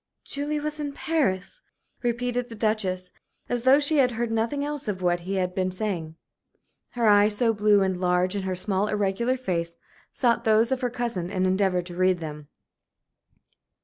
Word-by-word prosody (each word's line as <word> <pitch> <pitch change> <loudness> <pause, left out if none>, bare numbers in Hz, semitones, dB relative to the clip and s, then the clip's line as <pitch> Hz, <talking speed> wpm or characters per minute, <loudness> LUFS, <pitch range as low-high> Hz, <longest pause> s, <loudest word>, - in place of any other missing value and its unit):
"Julie 290 +2 -3
was 305 +1 -3
in 290 -1 -3
Paris?" 290 - -1 0.4
repeated 245 0 -1
the 230 - -8
Duchess, 195 -4 -1 0.4
as 245 -1 -1
though 260 +3 +6
she 295 +1 +2
had 255 -3 +3
heard 230 0 -2
nothing 230 +6 0
else 295 -3 -4
of 185 -3 -3
what 175 0 +2
he 185 +3 -4
had 180 -1 -1
been 185 0 -1
saying. 185 -5 -3 0.8
Her 235 -2 +1
eyes, 205 0 +5
so 230 -1 +3
blue 205 -1 +4
and 190 -1 -1
large 180 +1 +1
in 200 - -1
her 190 -1 -2
small, 195 +2 0
irregular 210 +5 0
face, 170 -8 -3 0.3
sought 235 -2 +1
those 220 +2 +3
of 265 0 0
her 250 - 0
cousin 235 -8 -3
and 185 -1 0
endeavored 185 -1 +1
to 175 -1 -8
read 185 0 +3
them. 150 -2 -7
210 Hz, 180 wpm, -25 LUFS, 185-245 Hz, 0.8 s, though